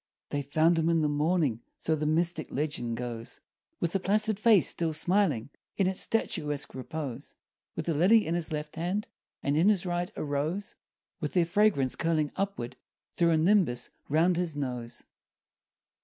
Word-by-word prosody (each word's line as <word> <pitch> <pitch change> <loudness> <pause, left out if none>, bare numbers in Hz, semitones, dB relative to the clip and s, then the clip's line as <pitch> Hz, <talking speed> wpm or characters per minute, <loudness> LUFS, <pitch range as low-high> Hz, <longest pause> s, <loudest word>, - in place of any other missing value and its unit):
They 145 - -1
found 160 +4 +2
him 165 +1 +2
in 165 -1 +3
the 150 - +2
morning 150 -5 +1 0.2
So 160 - 0
the 150 0 -2
mystic 165 0 0
legend 130 -5 -2
goes 120 -1 -6 0.4
With 170 - 0
the 195 - 0
placid 210 +2 +1
face 215 -4 +5
still 165 -2 -1
smiling 175 - +1 0.3
In 195 - +3
its 185 0 +1
statuesque 150 -10 -1
repose; 135 -1 -6 0.4
With 160 - -4
a 165 - +2
lily 195 +9 +5
in 165 - -1
his 170 -2 -1
left 150 0 -4
hand, 185 +6 -1 0.4
And 140 +1 +1
in 170 +7 +4
his 195 -4 +2
right 175 +2 -2
a - - -3
rose, 155 +7 -2 0.5
With 150 - -3
their 175 -2 +3
fragrance 170 -7 +2
curling 155 -3 0
upward 130 -12 -3 0.4
Through 170 -1 +2
a 160 - +4
nimbus 160 -8 +2 0.2
'round 165 +4 +3
his 175 -4 -1
nose. 125 -4 -4
160 Hz, 170 wpm, -29 LUFS, 145-180 Hz, 0.5 s, face